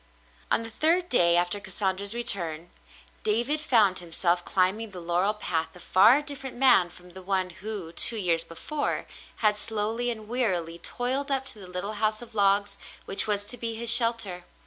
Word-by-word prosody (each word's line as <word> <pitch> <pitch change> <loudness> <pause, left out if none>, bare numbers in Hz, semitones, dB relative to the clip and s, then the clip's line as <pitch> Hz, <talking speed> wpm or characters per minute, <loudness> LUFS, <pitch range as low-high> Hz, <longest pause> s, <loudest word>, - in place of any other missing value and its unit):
On 230 - +1
the 225 - -9
third 340 +8 0
day 170 -7 +3
after 175 +3 0
Cassandra's 195 +1 -3
return, 175 -8 -1 0.5
David 240 +8 +1
found 220 -10 +2
himself 175 +1 -1
climbing 195 +5 0
the 185 -3 -10
laurel 175 +5 -1
path 165 -5 -3
a - - -12
far 225 - +4
different 275 -2 -7
man 245 -9 +5
from 180 +1 -15
the 190 +2 -10
one 185 -1 -1
who, 190 -2 -7
two 225 +6 +5
years 170 -5 +1
before, 290 - -4 0.4
had 210 -1 +4
slowly 220 +3 -2
and 220 -3 -5
wearily 180 -9 0
toiled 260 +9 -1
up 270 -1 +1
to 220 - -6
the 190 - -9
little 180 +4 -2
house 215 0 +1
of 235 -1 -11
logs 200 -1 +2 0.3
which 195 - +4
was 205 -1 0
to 245 +4 -5
be 230 -1 -3
his 230 +1 +3
shelter. 230 -7 +3
205 Hz, 175 wpm, -26 LUFS, 180-235 Hz, 0.5 s, man